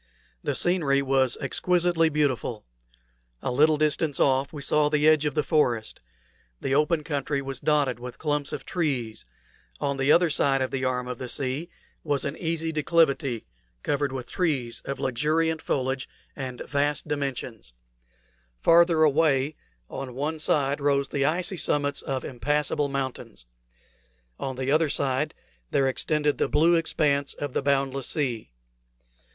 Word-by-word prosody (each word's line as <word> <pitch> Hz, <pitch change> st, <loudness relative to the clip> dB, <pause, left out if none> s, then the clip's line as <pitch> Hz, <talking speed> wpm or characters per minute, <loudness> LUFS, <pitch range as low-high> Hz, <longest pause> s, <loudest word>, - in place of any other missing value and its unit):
The -, -, -1 dB
scenery 150 Hz, -6 st, +2 dB
was 130 Hz, -2 st, +2 dB
exquisitely 175 Hz, -2 st, +2 dB
beautiful. 140 Hz, -7 st, -1 dB, 0.8 s
A -, -, -1 dB
little 150 Hz, +4 st, +4 dB
distance 150 Hz, -1 st, 0 dB
off 135 Hz, +1 st, +2 dB
we 145 Hz, -2 st, -6 dB
saw 150 Hz, +1 st, +3 dB
the 150 Hz, 0 st, +2 dB
edge 155 Hz, -1 st, +5 dB
of 150 Hz, -, -3 dB
the 150 Hz, -, +2 dB
forest; 120 Hz, -9 st, 0 dB, 0.6 s
the 135 Hz, -, -2 dB
open 150 Hz, +2 st, +2 dB
country 140 Hz, -1 st, -2 dB
was 135 Hz, -1 st, -5 dB
dotted 145 Hz, -5 st, +1 dB
with 125 Hz, 0 st, -8 dB
clumps 150 Hz, -2 st, -1 dB
of -, -, -6 dB
trees; 130 Hz, -, -2 dB, 0.5 s
on 140 Hz, -1 st, -1 dB
the 135 Hz, +2 st, +2 dB
other 170 Hz, -1 st, +4 dB
side 135 Hz, -2 st, +2 dB
of 130 Hz, -, -1 dB
the 135 Hz, 0 st, -2 dB
arm 125 Hz, -1 st, -1 dB
of 125 Hz, -1 st, -5 dB
the 125 Hz, -, -5 dB
sea 140 Hz, +6 st, -3 dB, 0.3 s
was 145 Hz, -2 st, -1 dB
an 140 Hz, +1 st, -3 dB
easy 165 Hz, -1 st, -2 dB
declivity 150 Hz, -6 st, +1 dB, 0.4 s
covered 145 Hz, -1 st, 0 dB
with 130 Hz, -2 st, -5 dB
trees 140 Hz, -11 st, -1 dB
of 140 Hz, -, -4 dB
luxuriant 155 Hz, +5 st, 0 dB
foliage 130 Hz, -1 st, -2 dB, 0.3 s
and 130 Hz, -3 st, -6 dB
vast 145 Hz, 0 st, -1 dB
dimensions; 135 Hz, -, -4 dB, 0.9 s
farther 165 Hz, -1 st, +5 dB
away 150 Hz, -1 st, +2 dB, 0.3 s
on 125 Hz, -, -7 dB
one 155 Hz, +4 st, -2 dB
side 145 Hz, -2 st, +1 dB
rose 140 Hz, -1 st, +1 dB
the 140 Hz, -1 st, 0 dB
icy 180 Hz, +4 st, +1 dB
summits 145 Hz, -2 st, 0 dB
of 135 Hz, -1 st, -3 dB
impassable 145 Hz, +3 st, 0 dB
mountains; 130 Hz, -, -5 dB, 0.9 s
on 130 Hz, -, -3 dB
the 130 Hz, +1 st, -2 dB
other 155 Hz, +1 st, +3 dB
side 140 Hz, +2 st, -1 dB, 0.3 s
there 135 Hz, -, +2 dB
extended 150 Hz, +2 st, 0 dB
the -, -, +1 dB
blue 165 Hz, +3 st, +4 dB
expanse 150 Hz, -4 st, +1 dB
of 145 Hz, -3 st, -5 dB
the -, -, 0 dB
boundless 135 Hz, -1 st, 0 dB
sea. 125 Hz, -8 st, -2 dB
140 Hz, 150 wpm, -26 LUFS, 135-155 Hz, 0.9 s, edge